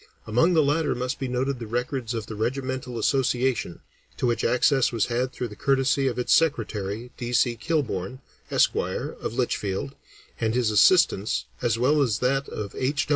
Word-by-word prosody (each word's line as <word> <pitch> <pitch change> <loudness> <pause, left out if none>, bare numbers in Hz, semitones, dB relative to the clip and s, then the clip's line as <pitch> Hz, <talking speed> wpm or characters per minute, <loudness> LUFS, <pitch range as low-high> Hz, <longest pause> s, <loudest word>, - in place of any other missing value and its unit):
Among 125 +11 +3
the 160 - +5
latter 145 0 +1
must 125 +3 -3
be 135 - -2
noted 130 +1 -1
the 115 - -6
records 125 +1 -2
of 110 -2 -3
the 110 - -7
Regimental 130 +2 -3
Association, 125 -5 0 0.4
to - - -1
which 120 -1 0
access 130 +1 +3
was 115 -3 +1
had 125 +2 -1
through 125 -3 -4
the 105 - -10
courtesy 135 +1 +1
of 125 -2 -2
its 125 - +2
secretary, 115 -6 0
D. 120 -1 -4
C. 120 0 +3
Kilbourn, 125 - -2 0.3
Esq., - - +3
of 115 - -3
Litchfield, 95 - -2 0.5
and 110 0 0
his 120 -3 +2
assistance, 105 - +4 0.2
as 115 - +1
well 145 +5 +3
as 115 -6 +1
that 135 +3 0
of 105 -2 -6
H. 145 +4 -1
125 Hz, 175 wpm, -25 LUFS, 115-135 Hz, 0.5 s, the